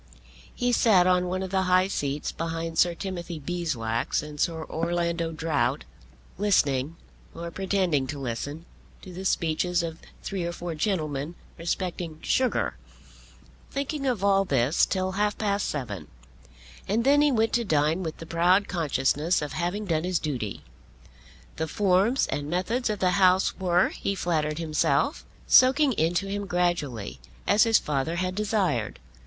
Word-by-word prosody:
He 245 0 0
sat 210 -6 +5
on 180 0 +3
one 185 +1 -2
of 190 - -5
the 190 -1 +2
high 185 +1 +4
seats 145 -6 -2
behind 165 0 -3
Sir 175 -1 +4
Timothy 175 -3 -5
Beeswax 145 -10 -2
and 150 -1 -9
Sir 160 0 0
Orlando 170 0 -1
Drought, 160 - 0 0.6
listening, 150 -8 +2 0.4
or 170 0 -6
pretending 185 -7 0
to 145 - -5
listen, 140 +5 -5 0.4
to 185 - -10
the 190 +2 -7
speeches 175 0 +1
of 165 -1 -5 0.2
three 190 -3 -3
or 170 0 -3
four 175 -1 -5
gentlemen 155 -3 -2 0.2
respecting 170 -1 -3
sugar, 255 -4 +1 0.9
thinking 280 0 -3
of 235 -7 0
all 195 -1 +4
this 135 -3 +2
till 185 -1 -1
half 205 +2 0
past 205 -2 0
seven; 120 -10 -4 0.8
and 220 +4 +1
then 285 +3 +5
he 295 -1 +4
went 225 -3 +1
to 240 - +2
dine 155 -2 +1
with 160 -3 -4
the 165 - -9
proud 175 +4 +3
consciousness 155 0 +1
of 150 -1 -5
having 175 +6 -2
done 160 -4 0
his 180 0 0
duty. 125 -11 -4 0.9
The 160 - -1
forms 200 - +2
and 145 +1 -3
methods 210 +9 -1
of 210 - -1
the 185 -1 +2
House 185 0 +4
were, 180 -1 +3
he 200 - -3
flattered 155 -4 -1
himself, 160 -2 +1 0.2
soaking 265 +2 +5
into 175 +1 +1
him 200 0 -4
gradually, 175 - -1 0.3
as 210 +3 +5
his 225 -1 +5
father 150 +3 -1
had 185 +1 -1
desired. 190 - 0
175 Hz, 150 wpm, -26 LUFS, 155-195 Hz, 0.9 s, sat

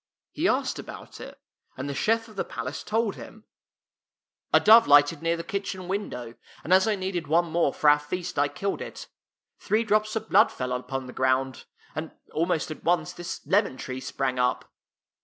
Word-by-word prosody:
He - - 0
asked - - 0
about - - -10
it, - - -10 0.4
and 130 +2 -4
the 140 - -3
chef 225 +9 +1
of 215 - -15
the - - -1
palace 130 +5 -5
told 220 -1 0
him: 220 0 -12 0.6
" - - -68 0.3
A - - +6
dove 225 +2 +7
lighted 145 +2 +5
near 165 0 0
the 170 - -5
kitchen 195 -2 -4
window, 125 - -4 0.3
and 180 - +1
as 190 +3 +5
I 215 - +2
needed 185 -4 -3
one 170 +3 +3
more 170 -4 +2
for 150 - -1
our 145 0 +7
feast, 180 +2 -4
I 145 - +4
killed 195 +6 -3
it. - - -7 0.5
Three 220 +2 +1
drops 215 0 +1
of 220 - -3
blood - - +5
fell 125 0 -3
upon 130 +1 -4
the 125 - -9
ground, 130 0 0 0.3
and 155 +1 -4 0.2
almost 165 -1 0
at 155 - -8
once 170 -2 +1
this 175 -1 -7
lemon 200 -9 +2
tree 130 0 -5
sprang 130 0 -2
up." 125 0 0
165 Hz, 195 wpm, -26 LUFS, 135-200 Hz, 0.6 s, dove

